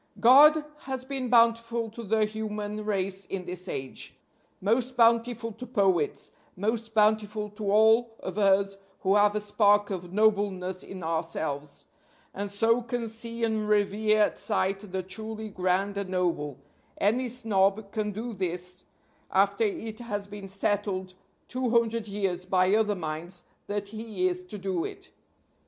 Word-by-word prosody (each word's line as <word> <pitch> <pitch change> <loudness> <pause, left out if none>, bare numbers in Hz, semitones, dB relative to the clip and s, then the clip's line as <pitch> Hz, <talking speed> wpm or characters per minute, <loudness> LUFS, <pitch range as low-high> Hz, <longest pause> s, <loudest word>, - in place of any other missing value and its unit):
God 295 +5 +7 0.2
has 260 -1 -4
been 265 -2 -3
bountiful 230 -1 +3
to 235 - -8
the 220 0 +2
human 210 -1 -4
race 195 -2 -2
in 185 -2 -4
this 180 +1 -3
age. 130 -5 -6 0.4
Most 245 +5 +1
bountiful 230 0 +3
to 225 +4 -9
Poets; 190 -7 +1 0.3
most 220 +3 -1
bountiful 215 0 +2
to 210 -1 -4
all 225 +2 +4
of 185 - -6
us 195 0 +3 0.2
who 190 - +2
have 205 0 +4
a - - +1
spark 205 -1 +3
of 180 -2 -5
nobleness 195 -3 +1
in 185 -2 -8
ourselves, 160 -3 -3 0.5
and 200 +1 -4
so 225 +4 +2
can 240 -1 -3
see 230 +1 -5
and 220 -2 0
revere 210 +1 +3
at - - -1
sight 195 -3 0
the 190 0 -2
truly 220 +3 -5
grand 190 +1 0
and 200 -2 -4
noble 170 -7 -1 0.4
(any 240 +5 +1
snob 205 -3 +1
can 215 -2 -2
do 225 +4 -5
this 180 -1 -3 0.4
after 200 +3 +2
it 220 +2 -4
has 210 -4 -4
been 200 -1 -9
settled 195 -1 -1 0.3
two 255 -1 -2
hundred 230 -1 +1
years 195 -3 -2
by 185 +1 +2
other 210 -1 +2
minds 170 +1 -6 0.2
that 205 -1 -3
he 215 -4 -2
is 180 0 -2
to 180 +3 -7
do 190 -3 -2
it). - - -8
205 Hz, 150 wpm, -28 LUFS, 190-225 Hz, 0.5 s, God